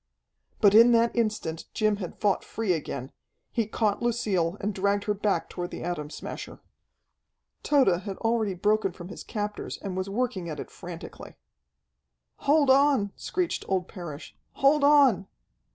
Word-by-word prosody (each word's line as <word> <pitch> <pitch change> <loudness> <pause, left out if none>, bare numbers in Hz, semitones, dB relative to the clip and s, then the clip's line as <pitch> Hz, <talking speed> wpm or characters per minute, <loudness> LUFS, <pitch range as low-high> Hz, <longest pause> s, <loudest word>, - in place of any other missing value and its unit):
But 205 -3 +6
in 230 +2 +8
that 230 0 +3
instant 215 -8 -1
Jim 215 -1 +2
had 185 -4 -7
fought 205 -2 +1
free 220 -5 -1
again. 140 -4 -5 0.4
He 230 -4 0
caught 215 -1 0
Lucille 205 -7 0
and 210 +1 -2
dragged 200 +1 0
her 210 - 0
back 205 0 0
toward 175 -1 -5
the - - -7
Atom 165 -4 -3
Smasher. - - -7 1.0
Tode 255 - +3
had 200 -2 -6
already 225 -4 0
broken 205 0 +1
from 175 0 -10
his - - -8
captors 210 -2 -4
and 195 -3 -6
was 185 +1 -3
working 200 -5 -2
at 155 - -5
it - - -7
frantically. 175 -2 -9 1.0
"Hold 290 -2 +3
on!" 270 -7 +4
screeched 360 -1 -2
old 185 -2 0
Parrish. 170 -5 -9 0.2
"Hold 280 +1 +3
on!" 275 -10 +5
205 Hz, 150 wpm, -27 LUFS, 180-235 Hz, 1.0 s, in